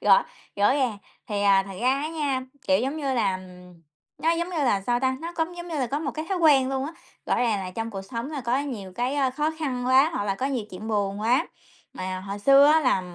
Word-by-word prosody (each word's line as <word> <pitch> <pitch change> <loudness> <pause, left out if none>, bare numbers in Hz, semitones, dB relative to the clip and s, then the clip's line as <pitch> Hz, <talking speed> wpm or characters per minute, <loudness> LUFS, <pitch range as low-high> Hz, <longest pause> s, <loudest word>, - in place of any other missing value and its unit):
Rõ - - +5 0.3
rõ 205 +4 +4
ràng. 255 -7 0 0.3
Thì, 205 -2 -1
à, 195 -1 +5
thật 195 - -7
ra 245 - +2
á 305 - -2
nha, 290 -5 -1 0.3
kiểu 190 0 +5
giống 270 +5 -2
như 275 -4 -1
là, 195 -6 +1 0.8
nó 325 - +2
giống 340 +1 0
như 355 - -4
là, 240 -9 +2
sao 240 +4 0
ta, 260 0 +1
nó 335 +1 -5
cũng 330 +2 -2
giống 345 0 -7
như 330 - -5
là 260 - 0
có 275 +5 -2
một 300 -3 -3
cái 310 +3 -5
thói 385 - 0
quen 285 -6 +5
luôn 265 0 -1
á. 315 - -6 0.3
Rõ - - +2
ràng 230 -4 +1
là 185 -1 -5
trong 225 +5 -4
cuộc 195 -3 -6
sống 235 +6 -5
là 295 -3 -4
có 245 +1 0
nhiều 235 -10 -5
cái 245 +5 -1
á 275 -3 +2
khó 300 +4 -1
khăn 255 -6 -2
quá, 265 +4 +5
hoặc 205 - -1
là 195 -1 0
có 255 +7 -2
nhiều 260 -6 -2
chuyện 190 +4 -7
buồn 205 -2 -1
quá. 235 +4 +2 0.5
Mà 185 0 -4
hồi 200 +1 -6
xưa 275 +6 +6
á 310 +2 +5
là 255 -9 +2
255 Hz, 260 wpm, -25 LUFS, 205-290 Hz, 0.8 s, xưa